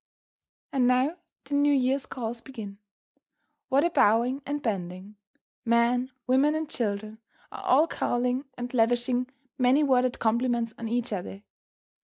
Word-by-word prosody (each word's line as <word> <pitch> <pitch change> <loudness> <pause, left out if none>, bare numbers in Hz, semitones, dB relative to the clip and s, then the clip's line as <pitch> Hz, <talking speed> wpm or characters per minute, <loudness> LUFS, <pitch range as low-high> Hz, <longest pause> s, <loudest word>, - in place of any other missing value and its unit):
And 255 -3 +3
now 255 +7 +2 0.3
the 280 - -8
New 285 +1 +4
Year's 265 +1 +1
calls 235 -2 -5
begin. 215 -7 -9 0.9
What 275 +2 +3
a 345 - +1
bowing 240 +3 +3
and 290 +1 -2
bending! 195 -3 -4 0.5
Men, 235 +2 +2 0.2
women, 270 +4 +3
and 315 0 -2
children 215 -4 -3 0.3
are - - -8
all 285 +5 +5
calling 250 -2 -1
and 245 +1 -5
lavishing 245 +1 +1 0.3
many 255 +4 +4
worded 255 -3 +2
compliments 235 0 0
on 230 - -4
each 235 0 -1
other. 195 +1 -6
245 Hz, 135 wpm, -27 LUFS, 225-265 Hz, 0.9 s, all